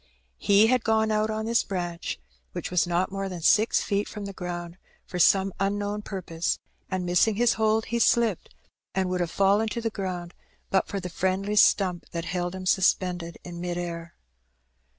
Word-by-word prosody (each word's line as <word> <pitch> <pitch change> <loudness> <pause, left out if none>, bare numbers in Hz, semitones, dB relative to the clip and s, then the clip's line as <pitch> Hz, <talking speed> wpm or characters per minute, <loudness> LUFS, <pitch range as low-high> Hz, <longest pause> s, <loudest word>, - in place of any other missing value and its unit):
He 200 +1 +5
had 250 +1 +2
gone 220 0 +2
out 215 0 +1
on 220 0 -2
this 230 +1 +3
branch, 175 - -4 0.3
which - - -5
was 180 -1 +2
not 175 +3 0
more 195 0 -3
than 175 -3 -7
six 220 +6 +4
feet 200 0 -1
from 210 -2 -7
the 200 - -6
ground, 175 -1 -6 0.3
for 180 - -5
some 195 +1 +4
unknown 205 +1 -1
purpose, 170 -5 -3 0.3
and, 185 -1 -2
missing 180 +5 +3
his 240 +2 +3
hold, 220 0 +1
he 235 +1 -2
slipped, 230 -4 +2 0.4
and 190 -1 0
would 180 - -1
have 175 - -1
fallen 200 +5 +2
to 235 - -3
the 225 -1 -2
ground 180 -3 -5 0.4
but 190 - +2
for 200 - -3
the 180 - -5
friendly 190 +4 -1
stump 185 -4 +3
that 170 -1 -3
held 175 +1 -2
him 185 0 -7
sus 185 0 +4
pended 175 -2 -6
in 175 -1 -8
mid 175 -1 -3
air. 170 -1 -5
190 Hz, 190 wpm, -26 LUFS, 175-210 Hz, 0.4 s, He